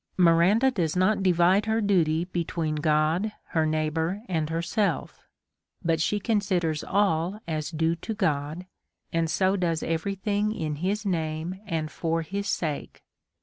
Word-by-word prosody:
Miranda 185 +9 +5
does 170 -9 -1
not 185 +3 +2
divide 185 +3 +3
her 220 +1 +2
duty 170 -6 +2
between 170 -3 -2
God, 155 +7 +1 0.2
her 160 -1 +1
neighbour, 160 +5 -1
and 160 -4 -1
herself; 170 +1 -1 0.6
but 165 -1 +2
she 210 +5 +1
considers 190 -8 0
all 190 -1 +1
as 155 -2 -2
due 160 0 0
to 220 +6 -5
God, 150 +1 -1 0.5
and 165 -1 +1
so 190 +3 +2
does 170 -4 0
every 165 +5 -1
thing 205 +2 0
in 155 -5 -3
his 200 +6 -1
name, 165 0 -2
and 160 -4 -2
for 165 0 -1
his 200 +5 -4
sake. 155 -4 -3
170 Hz, 145 wpm, -26 LUFS, 160-195 Hz, 0.6 s, Miranda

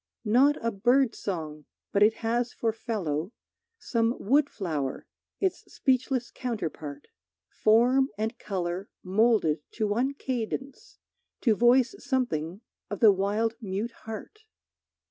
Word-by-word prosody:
Not 260 +7 +5
a 230 - +2
bird 240 +4 +3
song, 155 -6 -5 0.3
but 200 - +1
it 215 +2 +6
has 240 +2 0
for 225 -1 -1
fellow 195 - -3 0.4
Some 230 - 0
wood 285 +7 +3
flower, 150 -9 -3 0.3
its 380 -2 0
speechless 255 -1 0
counterpart, 160 - -5 0.4
Form 245 +5 +3
and 220 +3 -2
color 185 -1 -3
moulded 195 -5 +3
to 220 - -1
one 245 +7 0
cadence, 260 +1 -4 0.4
To 225 -4 +3
voice 245 - +4
something 205 - -1 0.3
of 205 - -4
the 220 -3 +8
wild 205 +4 0
mute 205 +3 -3
heart. 225 - -9
225 Hz, 120 wpm, -28 LUFS, 195-250 Hz, 0.4 s, the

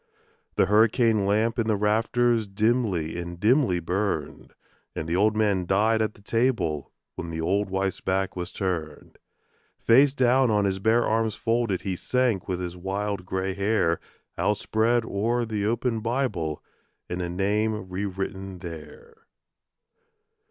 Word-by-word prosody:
The - - +4
hurricane 110 0 +3
lamp 110 +4 +1
in 115 - 0
the 110 - +2
rafters 115 +2 +1
dimly 100 -6 0
and 85 0 -6
dimly 110 -3 +3
burned; 90 -2 -3 0.4
And 80 - -4
the 85 - 0
old 105 +3 +3
man 100 -5 +1
died 110 +4 +2
at 110 -1 -1
the 100 - -19
table 115 - 0 0.2
when 85 - -6
the 80 0 -5
old 95 +4 0
wife's 95 0 -2
back 95 +1 -1
was 90 0 -5
turned. 85 -6 -4 0.6
Face 135 +4 +4
down 130 0 +3
on 105 -2 +2
his 95 -1 0
bare 110 +4 +3
arms 110 -1 0
folded 115 -4 0
he 95 -2 -2
sank 125 -1 0
with 90 -2 -2
his 90 -1 -5
wild 95 +1 -3
grey 95 0 -2
hair 100 -4 +1 0.4
Outspread 110 +4 +1
o'er 115 +4 0
the 105 -2 -2
open 115 0 0
Bible 110 - -2 0.4
and 90 0 -4
a 90 - -3
name 105 +3 -1
re 95 +2 -3
written 95 0 -5
there. 445 - -11
105 Hz, 145 wpm, -26 LUFS, 95-115 Hz, 0.6 s, The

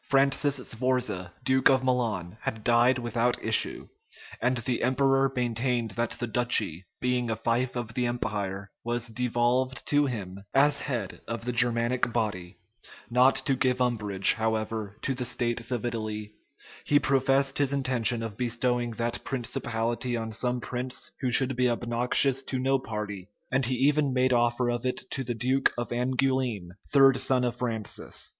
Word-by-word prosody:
Francis 140 +1 +3
Sforza, 120 -7 -1
duke 130 0 +4
of 130 -1 +3
Milan, 110 -8 -1
had 110 -1 -4
died 120 +2 +4
without 120 0 -1
issue; 110 0 +1 0.5
and 125 +1 +1
the 120 +1 -2
emperor 135 +1 +2
maintained 120 -1 -1
that 115 +4 -1
the 120 - -2
duchy, 110 -7 0
being 125 -1 0
a 110 - 0
fief 120 +3 -1
of 120 -2 -4
the 125 0 0
empire, 100 -5 -3
was 120 0 -1
devolved 125 +2 0
to 145 0 +2
him, 100 -6 -6
as 145 +1 +4
head 120 -9 -4
of 115 0 -5
the 125 - -1
Germanic 120 +1 +1
body: 105 -7 -3 0.5
not 125 +2 +5
to 140 - +2
give 130 -1 +1
umbrage, 105 -6 +3
however, 110 -2 -2
to 135 - 0
the 125 -1 -3
states 120 -1 -1
of 120 -2 -2
Italy, 110 -2 -4 0.5
he 145 - +3
professed 135 0 +2
his 140 -2 +2
intention 125 -4 0
of 110 -3 -5
bestowing 120 0 0
that 115 +1 -2
principality 120 -1 -2
on 110 -1 -4
some 125 +3 -1
prince 125 +1 -3
who 130 - -1
should 130 +2 +3
be 125 0 +2
obnoxious 120 +3 +2
to 130 0 -3
no 135 +1 +1
party, 105 -5 -6 0.2
and 130 -1 +2
he 130 - 0
even 145 +2 +2
made 130 0 +2
offer 120 +1 +2
of 120 -1 -3
it 130 0 -1
to 135 - -2
the 120 -1 -3
duke 130 +4 +2
of 120 - -3
Angoulême, 125 -5 -1 0.2
third 135 -2 +6
son 130 -1 +1
of 120 -1 -1
Francis. 115 -4 -4
120 Hz, 160 wpm, -27 LUFS, 115-130 Hz, 0.5 s, third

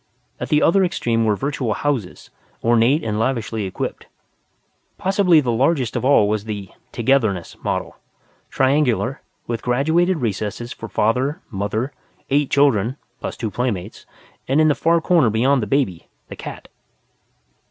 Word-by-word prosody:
At - - -4
the 150 0 +3
other 190 +3 +4
extreme 115 -10 0
were 105 -1 +2
virtual 130 -3 -2
houses, 130 -11 -3 0.3
ornate 120 +6 +3
and 105 -1 -2
lavishly 115 -3 -1
equipped. 95 - -5 0.9
Possibly 185 -4 +3
the 125 -4 -1
largest 130 +1 +1
of 120 - -1
all 130 -6 +5
was 105 0 -1
the 105 -3 -5 0.2
"Togetherness" 110 -8 0
model, - - -3 0.5
triangular, 135 -2 +1 0.2
with 115 -2 -3
graduated 160 +9 +2
recesses 115 -1 -3
for 115 - -9
Father, 130 - 0
Mother, 110 +6 -2 0.4
eight 145 0 +2
children 135 -3 +2 0.2
(plus - - -5
two 110 -3 -3
playmates), 110 -5 -3 0.4
and, 135 +4 +2
in 155 0 +5
the - - +4
far 165 +3 +2
corner 160 -8 +3
beyond 125 +5 +2
the 105 - -3
baby, 100 - 0 0.2
the - - -7
cat. - - -8
125 Hz, 140 wpm, -21 LUFS, 110-145 Hz, 0.9 s, all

